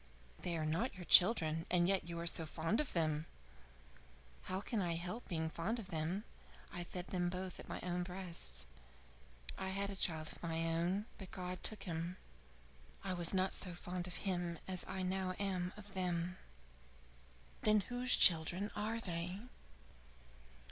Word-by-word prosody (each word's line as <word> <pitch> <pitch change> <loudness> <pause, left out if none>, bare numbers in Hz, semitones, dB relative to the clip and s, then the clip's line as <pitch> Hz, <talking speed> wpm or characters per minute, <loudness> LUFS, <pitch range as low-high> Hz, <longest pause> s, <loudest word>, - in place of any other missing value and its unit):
"They 170 -1 -1
are 155 - -1
not 170 +12 0
your 180 -2 -8
children 165 -6 +7
and 175 -1 +4
yet 190 -3 +1
you 170 0 -3
are 170 - -3
so 165 -1 +3
fond 165 +7 0
of 300 - -1
them?" 155 -2 +1 1.2
"How 185 - -1
can 215 +1 -1
I 170 -2 0
help 180 +8 -4
being 160 -3 -1
fond 180 +8 -1
of 210 -4 -7
them? 170 +4 -1 0.5
I 175 - -3
fed 175 +1 -6
them 175 -1 0
both 185 +1 -4
at - - -9
my - - -3
own 180 0 -1
breasts. 180 -1 -6 0.9
I 190 - -1
had 200 +1 -1
a - - -5
child 160 -4 +1
of - - -9
my 165 -1 -1
own, 170 +5 +1
but 190 -3 -7
God 180 -1 -4
took 215 - -1
him. 170 +1 -3 0.9
I 190 -1 -1
was 175 -2 +3
not 190 0 +2
so 180 -3 -1
fond 180 0 -4
of 180 - -5
him 175 -3 -1
as 185 -1 -2
I 190 - -3
now 185 0 -1
am 185 -3 -1
of 205 -1 -11
them." 180 -1 -1 1.2
"Then 215 -1 +5
whose 245 +4 +2
children 175 +4 +6
are 215 +2 0
they?" 180 -1 -2
180 Hz, 170 wpm, -38 LUFS, 170-195 Hz, 1.2 s, children